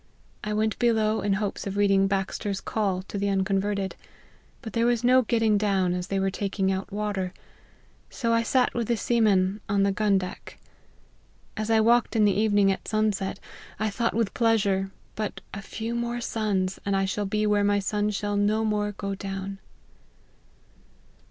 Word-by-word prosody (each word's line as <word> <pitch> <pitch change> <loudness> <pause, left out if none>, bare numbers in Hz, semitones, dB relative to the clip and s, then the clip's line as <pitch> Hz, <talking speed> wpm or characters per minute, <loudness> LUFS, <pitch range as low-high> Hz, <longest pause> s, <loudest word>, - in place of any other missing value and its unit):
I 210 - -3
went 215 0 0
below 220 -2 +2
in 200 -1 +1
hopes 200 0 -2
of 200 +1 -4
reading 195 -1 +4
Baxter's 195 0 -2
Call 195 -4 -1
to 200 - -6
the 200 0 0
Unconverted: 195 0 0 0.7
but 220 - -7
{here 230 +1 +2
was 240 -1 +1
no 255 +1 +6
getting 225 -3 +2
down, 195 -3 +1
as 180 0 -3
they 195 0 -1
were 195 0 0
taking 195 -1 -1
out 190 +1 -3
water: 200 -3 -3 0.7
so 230 -3 -1
I 230 - +3
sat 250 +2 +2
with 235 -2 -2
the 235 - +1
seamen 210 -4 +2
on 200 0 +2
the 200 - +3
gun 200 0 +2
deck. 185 -1 -6 1.0
As 215 0 -3
I 225 -1 +4
walked 235 +2 +3
in 215 -1 +4
the 200 - +4
evening 205 -1 +3
at 190 - -5
sunset, 215 -3 0 0.4
I 215 0 0
thought 230 +2 -1
with 225 -3 0
pleasure, 200 -5 +2 0.3
but 215 -2 -3
a 200 - -5
few 225 +4 -5
more 235 0 -2
suns, 205 -5 -1
and 200 -1 0
I 195 0 +2
shall 200 +1 -2
be 210 +2 0
where 205 -1 +2
my 205 0 +3
sun 205 +1 0
shall 205 0 -2
no 210 +2 +2
more 210 -1 0
go 200 0 -4
down." 195 0 -5
205 Hz, 175 wpm, -26 LUFS, 195-220 Hz, 1.0 s, no